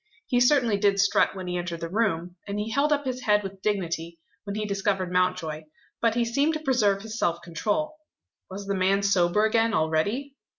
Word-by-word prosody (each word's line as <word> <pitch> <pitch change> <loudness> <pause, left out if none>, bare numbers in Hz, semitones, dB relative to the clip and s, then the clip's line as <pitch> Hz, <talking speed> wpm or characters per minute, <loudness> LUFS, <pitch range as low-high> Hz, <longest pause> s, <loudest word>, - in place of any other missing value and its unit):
He 245 - +1
certainly 245 -4 +3
did 200 -1 +2
strut 200 0 +3
when 190 -1 -6
he 180 0 -2
entered 170 -2 -5
the 165 - -3
room; 180 -3 -1
and 200 0 -3
he 210 +2 -3
held 280 +5 +1
up 290 -1 +1
his 255 -1 -3
head 210 -2 +2
with 195 0 -8
dignity, 170 -5 -2 0.3
when 200 0 -4
he 215 0 -2
discovered 195 -2 -1
Mountjoy. 180 -4 0 0.4
But 230 -1 +2
he 240 -1 +2
seemed 280 +7 +1
to - - -2
preserve 220 -9 +1
his 220 +1 -6
self 170 0 0
control. 210 - -2 0.5
Was 195 +1 -7
the 200 - -1
man 195 +1 +2
sober 200 +1 +3
again 225 0 +2
already? 205 - 0
200 Hz, 200 wpm, -26 LUFS, 180-230 Hz, 0.5 s, certainly